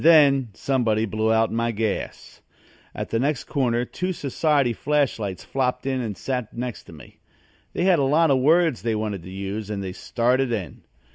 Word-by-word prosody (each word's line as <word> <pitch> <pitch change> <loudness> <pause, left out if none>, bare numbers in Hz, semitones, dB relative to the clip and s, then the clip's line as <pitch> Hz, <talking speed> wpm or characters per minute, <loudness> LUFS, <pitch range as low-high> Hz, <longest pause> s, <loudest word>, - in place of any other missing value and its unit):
And - - -4
then 140 -6 +6
somebody 115 -5 +1
blew 110 +1 0
out 110 0 +2
my 115 +1 0
gas. 110 -2 -4 0.5
At - - -5
the 115 - +1
next 140 +2 0
corner 125 -4 0
two 185 +8 -3
society 140 -3 +1
flash 145 +4 0
lights 100 -4 -4
flopped 125 -1 -1
in 130 -1 0
and 105 -5 -4
sat 125 +1 -4
next 120 -2 -5
to - - -13
me. 75 -7 -14 0.5
They - - -1
had 180 -3 +4
a - - +2
lot 150 +3 +3
of 135 - +3
words 160 0 +3
they 115 -2 0
wanted 105 -3 -3
to 90 - -11
use 100 +2 -5
and 100 -2 -3
they 95 -1 -5
started 125 +5 0
in. 95 - -4
120 Hz, 195 wpm, -24 LUFS, 110-140 Hz, 0.5 s, then